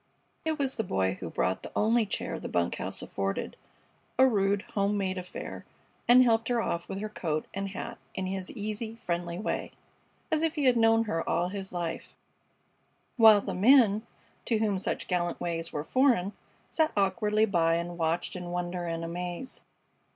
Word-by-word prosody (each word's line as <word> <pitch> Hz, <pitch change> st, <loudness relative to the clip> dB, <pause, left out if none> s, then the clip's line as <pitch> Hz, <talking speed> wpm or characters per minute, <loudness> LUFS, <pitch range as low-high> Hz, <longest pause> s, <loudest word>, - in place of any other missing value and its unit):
It 315 Hz, -1 st, -1 dB
was 275 Hz, -3 st, -1 dB
the 225 Hz, -, 0 dB
Boy 95 Hz, -, 0 dB
who 85 Hz, -, -5 dB
brought 95 Hz, +3 st, 0 dB
the -, -, -8 dB
only 225 Hz, +1 st, +3 dB
chair -, -, -3 dB
the -, -, -6 dB
bunk 85 Hz, -1 st, 0 dB
house -, -, -2 dB
afforded, 100 Hz, 0 st, -3 dB, 0.6 s
a 260 Hz, -, +7 dB
rude, 200 Hz, -4 st, +2 dB
home 200 Hz, 0 st, +1 dB
made 190 Hz, -1 st, -1 dB
affair, 180 Hz, 0 st, -7 dB, 0.4 s
and 250 Hz, +1 st, +8 dB
helped 225 Hz, -2 st, +2 dB
her 245 Hz, -1 st, +1 dB
off 170 Hz, -6 st, -2 dB
with 195 Hz, -, -4 dB
her 215 Hz, -, -2 dB
coat 160 Hz, -7 st, -2 dB
and 195 Hz, 0 st, -3 dB
hat 190 Hz, -, -6 dB, 0.2 s
in 190 Hz, -, -2 dB
his 190 Hz, 0 st, -3 dB
easy, 215 Hz, +2 st, -4 dB
friendly 170 Hz, -5 st, -3 dB
way, 210 Hz, -, -3 dB, 0.6 s
as 315 Hz, -1 st, +2 dB
if 325 Hz, 0 st, 0 dB
he 295 Hz, -, -1 dB
had 255 Hz, -2 st, +5 dB
known 225 Hz, 0 st, +4 dB
her 165 Hz, -7 st, -2 dB
all 175 Hz, +1 st, +1 dB
his 195 Hz, 0 st, -5 dB
life; 170 Hz, -2 st, -4 dB, 1.0 s
while 220 Hz, -3 st, +8 dB
the -, -, -4 dB
men, 220 Hz, 0 st, +5 dB, 0.4 s
to 230 Hz, -, +2 dB
whom 210 Hz, -3 st, +1 dB
such -, -, -3 dB
gallant 175 Hz, -2 st, -1 dB
ways 165 Hz, -1 st, -3 dB
were 145 Hz, -, -3 dB
foreign, 235 Hz, -, +2 dB, 0.4 s
sat 315 Hz, -1 st, +2 dB
awkwardly 210 Hz, +2 st, +2 dB
by 165 Hz, -5 st, +2 dB
and 170 Hz, +1 st, -4 dB
watched 165 Hz, +3 st, 0 dB
in 180 Hz, -1 st, -5 dB
wonder 175 Hz, 0 st, -3 dB
and 165 Hz, 0 st, -3 dB
amaze. 175 Hz, +7 st, -5 dB
195 Hz, 180 wpm, -29 LUFS, 175-225 Hz, 1.0 s, and